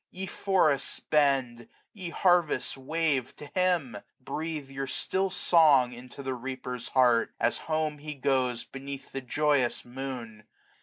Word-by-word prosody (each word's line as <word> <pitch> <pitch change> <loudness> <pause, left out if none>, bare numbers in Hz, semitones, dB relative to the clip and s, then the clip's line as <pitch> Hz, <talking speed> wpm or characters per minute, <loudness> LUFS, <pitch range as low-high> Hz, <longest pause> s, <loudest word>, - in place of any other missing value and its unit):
Ye 190 +1 -4
forests 165 -7 +1
bend, 135 -6 +1 0.3
ye 185 -6 -6
harvests 175 -2 +2
wave, 140 -2 -1
to - - -10
Him; 175 - +1 0.2
Breathe 155 +2 -4
your 135 0 -5
still 190 +8 0
song 155 -8 +5
into 125 +3 -10
the 130 0 -2
reaper's 125 -1 -5
heart, 120 -3 +4
60 - - -46
As - - +2
home 155 -1 0
he 150 +1 -6
goes 130 -3 0
beneath 135 0 -8
the 135 - -4
joyous 140 -1 +1
moon. 120 -4 -7
135 Hz, 140 wpm, -28 LUFS, 125-155 Hz, 0.3 s, song